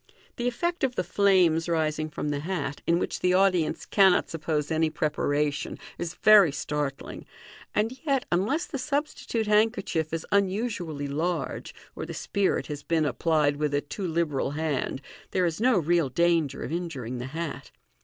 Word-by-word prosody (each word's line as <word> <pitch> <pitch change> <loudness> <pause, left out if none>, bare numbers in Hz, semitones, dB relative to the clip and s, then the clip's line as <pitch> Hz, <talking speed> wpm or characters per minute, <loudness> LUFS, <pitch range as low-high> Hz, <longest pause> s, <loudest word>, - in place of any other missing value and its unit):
The 240 - -1
effect 340 +8 -1
of 255 -2 +1
the - - 0
flames 175 -3 +3
rising 155 -1 0
from 150 - -4
the 145 -1 -1
hat, 150 -4 -3
in 170 - +4
which - - -2
the 180 0 +2
audience 185 -4 +2
cannot 190 -3 +4
suppose 155 -2 -2
any 160 0 +2
preparation, 150 -2 -1 0.2
is 170 -1 -4
very 210 -7 +7
startling, 145 -1 -4 0.5
and 225 +5 0
yet, 275 -3 +2
unless 210 - +1
the 275 - -5
substitute 280 -4 -2
handkerchief 210 -7 +1
is 165 0 -3
unusually 190 -7 0
large, 165 +5 -3 0.2
or - - -5
the - - -6
spirit 200 -2 0
has 145 -1 -6
been 160 0 +1
applied 150 0 +1
with 150 -1 0
a 145 - +1
too 185 +6 -5
liberal 160 -5 0
hand, 145 -2 -2 0.3
there 185 - +1
is 170 +4 -2
no 250 -2 +4
real 170 -3 +2
danger 165 -1 +1
of - - -5
injuring 140 -8 -4
the 125 - -5
hat. 160 +2 -5
165 Hz, 165 wpm, -27 LUFS, 150-195 Hz, 0.5 s, very